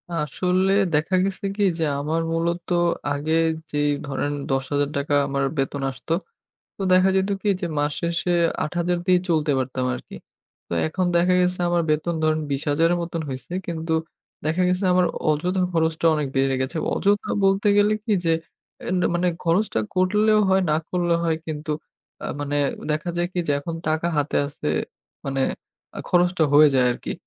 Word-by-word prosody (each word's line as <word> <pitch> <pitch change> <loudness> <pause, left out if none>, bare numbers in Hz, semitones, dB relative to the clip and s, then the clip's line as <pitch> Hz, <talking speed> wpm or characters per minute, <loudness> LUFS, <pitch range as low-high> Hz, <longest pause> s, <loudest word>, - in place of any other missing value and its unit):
আসলে 180 +5 0 0.2
দেখা 160 +5 +1
গেছে 195 0 -4
কি? 205 - 0 0.2
যে - - +1 0.2
আমার 160 +3 -1
মূলত 170 +1 -1 0.5
আগে 150 +3 -2 0.4
যেই 145 0 +1 0.2
ধরেন 145 +1 -2 0.2
৳১০,০০০ 140 +2 -1
আমার 140 0 -1
বেতন 135 +1 -1
আসত, 130 - -15 0.7
তো - - -7
দেখা 185 +1 +5
যেত 190 +1 +1
কি? 210 - 0
যে 175 - -1
মাস 145 0 0
শেষে 170 +1 -1 0.3
৮,০০০ 175 +2 -1
দিয়েই 180 -1 +4
চলতে 155 -2 +2
পারতাম 130 0 -2
আরকি। - - -10 0.5
তো - - -5
এখন 185 +3 -1
দেখা 180 +1 +3
গেছে 180 0 0
আমার 175 0 +2
বেতন 155 +3 0
ধরেন 155 0 +2
২০,০০০ 145 +4 +1
এর - - 0
মতন 165 -1 -3
হইছে। 130 +6 -7 0.2
কিন্তু 160 -1 -2 0.5
দেখা 160 +4 +1
গেছে 180 +2 0
আমার 180 0 +4 0.2
অযথা 180 +5 +1
খরচটা 160 0 0
অনেক 150 -2 -1
বেড়ে 135 0 +2
গেছে। 130 +5 -3 0.2
অযথা 205 +1 +1 0.2
বলতে 195 +2 +2
গেলে 205 +1 +4
কি 220 - +2
যে 165 - +3 0.5
এ - - -7 0.3
মানে 180 +1 +1 0.2
খরচটা 170 - +1 0.2
করলেও 210 +4 +3
হয় 190 0 +4
না - - +3
করলেও 175 -2 +1
হয় 160 -1 +1
কিন্তু 155 -1 -4 0.5
আ - - -3 0.2
মানে 145 0 -1 0.3
দেখা 155 +3 -2
যায় 175 0 +1
কি 180 - -1
যে 145 - +2
এখন 165 +3 -5
টাকা 160 +2 0
হাতে 145 +1 0
আছে 145 - -7 0.6
মানে 135 0 -1 0.7
খরচটা 175 -2 +3
হয়ে 150 +1 +8
যায় 125 -1 +4
আরকি। - - -6
165 Hz, 165 wpm, -23 LUFS, 145-180 Hz, 0.7 s, হয়ে